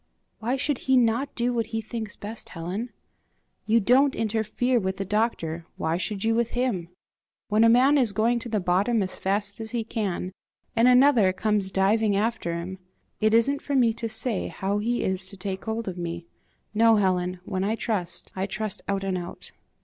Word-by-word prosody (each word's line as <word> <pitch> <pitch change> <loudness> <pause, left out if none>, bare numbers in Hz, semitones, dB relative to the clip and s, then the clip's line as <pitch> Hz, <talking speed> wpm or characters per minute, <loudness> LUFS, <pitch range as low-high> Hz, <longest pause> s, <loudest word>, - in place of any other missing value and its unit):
"Why 240 +4 -1
should 275 0 -1
he 260 - +6
not 245 +3 +1
do 245 +1 0
what 230 -3 -1
he 225 - -3
thinks 220 -1 -5
best, 215 +2 -7
Helen? 185 +8 -4 0.8
You 225 +2 +4
don't 265 +6 +4
interfere 225 +3 0
with 190 -2 -2
the 195 - -3
doctor 175 -6 -1
why 160 +1 0
should 195 +1 -3
you 225 0 +2
with 235 0 0
him? 235 -9 -1 0.6
When 215 +1 +4
a 230 - +6
man 265 +5 +5
is 240 -5 +3
going 230 +4 +1
to 235 - -7
the 215 -2 0
bottom 195 +5 +2
as 185 - -6
fast 200 +3 0
as 220 - -5
he 235 -1 -2
can, 200 -5 -3 0.4
and 230 +2 +5
another 250 -6 +6
comes 205 0 0
diving 200 +2 +2
after 215 -5 -1
him 180 +2 -6 0.4
it 215 0 +3
isn't 275 +5 +3
for 285 - -2
me 240 -4 +4
to 230 0 -4
say 225 -2 -1
how 200 +2 -2
he 235 +3 -1
is 190 0 -1
to 200 - -12
take 190 0 -5
hold 225 0 -3
of 180 -1 -4
me. 170 0 -4 0.5
No, 225 +1 +5
Helen; 185 -3 +1
when 190 -2 -2
I 215 +3 0
trust, 200 -7 -3
I 190 +1 -2
trust 215 0 -4
out 195 -1 -1
and 190 -2 -1
out." 175 0 -9
215 Hz, 195 wpm, -26 LUFS, 190-235 Hz, 0.8 s, he